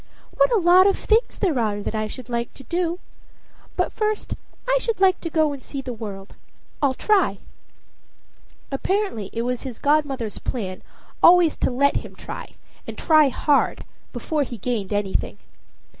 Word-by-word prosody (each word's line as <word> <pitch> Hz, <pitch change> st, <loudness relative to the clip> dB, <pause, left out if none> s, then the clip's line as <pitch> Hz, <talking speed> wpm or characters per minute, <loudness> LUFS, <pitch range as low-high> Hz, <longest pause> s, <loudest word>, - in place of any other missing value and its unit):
What -, -, +4 dB
a 470 Hz, -, +4 dB
lot 365 Hz, +1 st, +6 dB
of 395 Hz, -, +2 dB
things 445 Hz, +3 st, +1 dB
there 340 Hz, -, +1 dB
are 210 Hz, -3 st, 0 dB
that 205 Hz, -, -4 dB
I 215 Hz, 0 st, -1 dB
should 245 Hz, +2 st, -9 dB
like 235 Hz, -1 st, -3 dB
to 270 Hz, -, -12 dB
do! 340 Hz, +5 st, -1 dB, 0.8 s
But -, -, 0 dB
first 430 Hz, -1 st, -2 dB, 0.3 s
I -, -, +3 dB
should 460 Hz, -5 st, -1 dB
like 380 Hz, -1 st, +4 dB
to 335 Hz, -, -4 dB
go 310 Hz, -2 st, +2 dB
and 275 Hz, -, -8 dB
see 275 Hz, -, -7 dB
the 260 Hz, -2 st, -5 dB
world. 200 Hz, -3 st, -8 dB, 0.5 s
I'll 275 Hz, -3 st, +2 dB
try." 380 Hz, -, +2 dB, 1.3 s
Apparently 275 Hz, -, -1 dB
it 230 Hz, -, -2 dB
was 250 Hz, 0 st, -2 dB
his 255 Hz, -4 st, -7 dB
godmother's 280 Hz, -7 st, 0 dB
plan 190 Hz, -7 st, -4 dB, 0.4 s
always 345 Hz, -2 st, +6 dB
to -, -, +1 dB
let 280 Hz, +3 st, +2 dB
him -, -, -6 dB
try, -, -, -8 dB, 0.3 s
and -, -, -7 dB
try 310 Hz, -3 st, +5 dB
hard, 285 Hz, +2 st, +1 dB, 0.3 s
before 310 Hz, -3 st, -2 dB
he 245 Hz, -4 st, -3 dB
gained 215 Hz, -2 st, -3 dB
anything. 205 Hz, -2 st, -1 dB
280 Hz, 165 wpm, -23 LUFS, 230-355 Hz, 1.3 s, lot